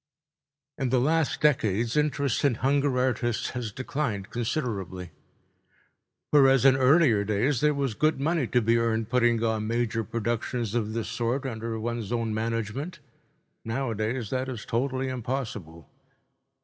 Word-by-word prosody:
In 135 -2 0
the 130 0 +3
last 155 +4 +1
decades 115 -6 +2
interest 145 -4 +1
in 140 -4 +3
hunger 140 +1 +1
artists 120 -2 0
has 120 -4 -4
declined 115 -5 -3
considerably. 100 - -3 1.2
Whereas 135 -3 +5
in 135 -1 +7
earlier 130 -5 +4
days 110 +6 0
there 150 -1 +3
was 140 -4 -1
good 155 +4 +1
money 155 -2 0
to 125 0 +1
be 115 +2 +3
earned 115 -1 0
putting 120 -2 +3
on 110 -1 0
major 115 -1 0
productions 115 0 -2
of 110 -2 -1
this 115 -3 -3
sort 120 +4 -2
under 115 -2 -4
one's 115 -2 -3
own 115 -2 -1
management, 115 +8 -3 0.7
nowadays 115 -1 -2
that 130 0 -1
is 120 -5 -6
totally 130 +2 -1
impossible. 110 - -5
120 Hz, 135 wpm, -27 LUFS, 110-135 Hz, 1.2 s, in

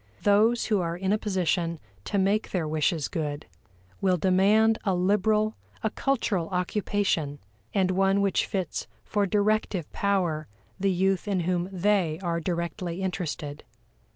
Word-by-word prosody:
Those 215 +4 +4
who 210 -4 +1
are 170 0 -2
in 190 +2 0
a - - +3
position 175 -4 0 0.3
to 205 - -1
make 200 +3 +1
their 170 -5 -1
wishes 155 0 0
good, 150 -3 -3 0.6
will 185 -2 +3
demand 200 +5 +4
a 190 -2 +1
liberal, 210 +4 +2 0.3
a 220 - +1
cultural 215 -12 0
occupation, 180 -5 0 0.3
and 190 -2 +2
one 195 +1 +3
which 200 -2 +1
fits 190 -6 -3 0.2
for 205 -2 0
directive 205 -4 +1
power 175 -6 0 0.3
the 195 +1 +2
youth 190 +1 +1
in 195 -3 +1
whom 180 +1 -1
they 185 -4 +1
are 170 -1 0
directly 170 +1 -3
interested. 160 -5 -4
190 Hz, 140 wpm, -27 LUFS, 170-205 Hz, 0.6 s, Those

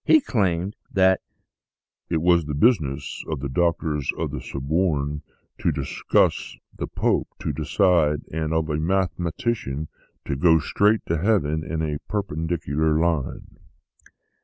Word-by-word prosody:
He 315 - +6
claimed 95 - 0 0.2
that 95 -1 +4 0.4
" - - -61
it 80 -2 0
was 85 -2 +4
the 75 -1 -3
business 75 - +1
of 80 -3 -3
the 70 - -3
Doctors 80 -2 0
of - - -2
the - - -5
Sorbonne 75 0 -1 0.4
to - - +1
discuss, - - 0 0.2
of - - -24
the - - -2
Pope - - 0
to 75 - -3
decide, 80 0 +2
and 80 -1 -2
of 80 -1 +1
a 75 - 0
mathematician 85 - -1 0.4
to 70 - -2
go 80 +3 +5
straight 105 +8 +2
to 85 -1 0
heaven 80 -7 +1
in 80 0 -3
a 75 -2 -2
per 105 -2 0
pendicular 80 -2 -1
line! 80 -5 -2
80 Hz, 145 wpm, -24 LUFS, 75-90 Hz, 0.4 s, He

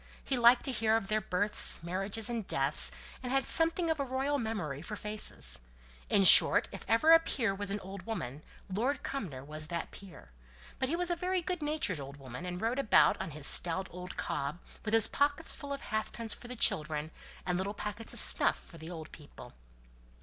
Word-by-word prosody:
He 270 - -1
liked 240 0 +5
to 270 - +1
hear 225 -2 +1
of 215 -2 -6
their 215 0 0
births, 190 +2 +1
marriages, 195 +5 -1
and 230 -4 -4
deaths, 135 +2 0 0.3
and 250 -1 -5
had 270 0 +1
something 330 +1 +3
of 315 - -2
a - - 0
royal 270 +2 -2
memory 200 - -4
for 210 +6 -7
faces. 210 - -1 0.5
In 195 - +3
short, - - +9
if - - -9
ever 230 +9 +3
a 330 - +9
peer 235 -10 -1
was 200 0 -4
an 200 +1 -2
old 190 -1 -10
woman, 150 - -5 0.3
Lord 245 +9 -2
Cumnor 170 - -5
was 155 +2 -6
that 170 +1 -5
peer; 185 - -13 0.5
but 260 - -1
he 330 - 0
was 355 0 0
a - - +1
very 365 +1 -2
good 360 0 -4
natured 295 - -1
old 140 +1 -9
woman, 135 +5 -9
and 180 0 -5
rode 230 +5 -1
about 275 - +3
on 190 - -5
his 150 -2 -5
stout 180 +4 +5
old 180 +1 -9
cob 140 +4 -3 0.3
with 220 0 0
his 225 -1 +5
pockets 285 +3 0
full 285 -1 -9
of 280 0 -4
halfpence 215 +1 -3
for 240 - -11
the 250 - -6
children, 155 -8 +1 0.3
and 180 -1 -1
little 200 +2 -4
packets 210 +2 -5
of - - -5
snuff - - +3
for 165 - -15
the 160 +2 -9
old 160 -3 -9
people. 150 -2 -14
210 Hz, 205 wpm, -31 LUFS, 175-260 Hz, 0.5 s, short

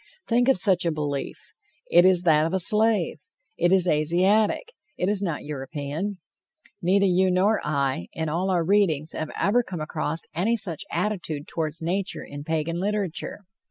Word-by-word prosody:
Think 245 +1 +2
of 270 - +4
such 185 -2 +3
a 170 - +1
belief! 145 -3 -3 0.5
It 175 +1 +6
is 185 -2 +5
that 155 -2 +4
of 175 - -2
a - - +1
slave. 210 -3 +3 0.4
It 175 +1 +1
is 185 -2 +4
Asiatic; 185 - +2 0.2
it 180 - -1
is 205 -1 +1
not 170 -7 -3
European. 145 +7 -5 0.6
Neither 195 +3 +3
you 185 0 +3
nor 195 +4 +2
I, 140 - -1
in 160 0 -3
all 175 +5 -1
our 175 -3 +1
readings, 165 -6 +2
have 155 - -4
ever 220 +5 +3
come 185 -7 -7
across 155 +1 -3
any 200 +8 +1
such 180 -7 -1
attitude 170 -5 -3
toward 155 -2 -3
nature 185 +4 -2
in 145 0 -8
Pagan 160 +2 -2
literature. 200 -1 -3
175 Hz, 165 wpm, -25 LUFS, 155-200 Hz, 0.6 s, It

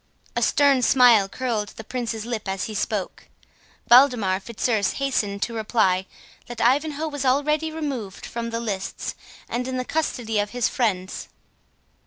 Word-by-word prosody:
A - - 0
stern 280 -3 +4
smile 240 -5 +5
curled 230 -4 -2
the 220 - -8
Prince's 225 -2 -4
lip 230 -4 -4
as 190 0 -2
he 220 - -4
spoke. 210 -2 -3 0.6
Waldemar 240 -7 +6
Fitzurse 215 -2 -1
hastened 210 -8 -1
to 235 - -3
reply, 210 -4 +1 0.4
that 240 -1 -8
Ivanhoe 295 +5 +1
was 290 -2 -4
already 300 +4 +1
removed 270 -11 -5
from 230 0 -4
the 230 0 -3
lists, 200 -4 -4 0.3
and 250 +2 -3
in 260 0 -3
the 255 - -2
custody 245 -9 -1
of 205 0 0
his 245 +1 0
friends. 195 -7 -2
235 Hz, 150 wpm, -24 LUFS, 210-260 Hz, 0.6 s, Waldemar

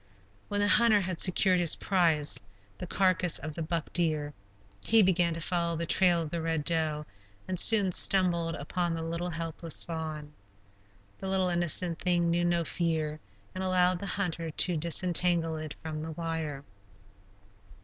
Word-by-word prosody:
When 205 0 -1
the 205 - +2
hunter 215 -1 +4
had 185 -2 -4
secured 185 0 +3
his 170 -2 +2
prize, 165 -6 +1 0.4
the 180 - -6
carcass 180 -2 +1
of 155 +2 -7
the 165 - -7
buck 165 -1 -4
deer, 155 -4 -1 0.5
he 225 -1 +4
began 175 -2 +2
to 165 - -6
follow 170 0 -1
the 170 +1 -3
trail 175 -1 +2
of 155 - -8
the 170 - -3
Red 160 -2 -2
Doe, 155 -2 -1 0.4
and 185 -2 -1
soon 205 -3 +5
stumbled 170 -3 +4
upon 170 +4 -3
the 165 - -5
little 170 +2 -4
helpless 165 0 -1
fawn. 155 -3 -6 0.9
The 190 - -5
little 190 -1 0
innocent 175 0 0
thing 175 -2 0
knew 175 +1 0
no 175 -1 +1
fear, 160 -2 -2 0.3
and 185 - -5
allowed 185 -1 +2
the 200 - -6
hunter 175 -4 -3
to 175 +3 +1
disentangle 170 0 +1
it 155 -1 -7
from 155 -1 -5
the 160 0 -6
wire. 160 -4 -5
170 Hz, 160 wpm, -28 LUFS, 160-180 Hz, 0.9 s, soon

